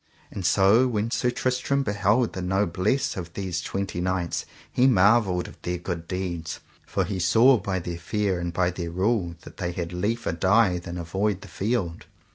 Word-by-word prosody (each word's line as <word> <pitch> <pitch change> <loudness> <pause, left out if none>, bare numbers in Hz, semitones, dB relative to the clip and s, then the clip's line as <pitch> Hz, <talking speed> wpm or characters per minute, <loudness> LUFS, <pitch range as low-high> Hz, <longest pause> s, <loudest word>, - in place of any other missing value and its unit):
And 100 - -5
so 100 +8 +5
when 115 -1 -1
Sir 125 - +1
Tristram 130 +3 0
beheld 105 +2 +1
the 95 - -4
noblesse 95 +6 0
of 85 -2 -6
these 90 -3 -2
twenty 95 0 -3
knights 90 -2 -1 0.2
he 125 - +4
marvelled 100 -4 +4
of - - -14
their 90 0 -2
good 85 -1 -5
deeds, 85 -4 -4 0.3
for - - 0
he 100 -3 -3
saw 115 +9 +5
by 95 -1 -2
their 85 -1 -5
fare 95 +1 -1
and 85 0 -3
by 90 +1 +1
their 85 -1 -5
rule 95 0 0
that - - -13
they 90 -2 -3
had 85 0 -4
liefer 110 +5 -1
die 95 +2 +3
than 85 0 -7
avoid 95 +5 -1
the - - -10
field. 100 -6 -2
95 Hz, 180 wpm, -25 LUFS, 85-105 Hz, 0.3 s, so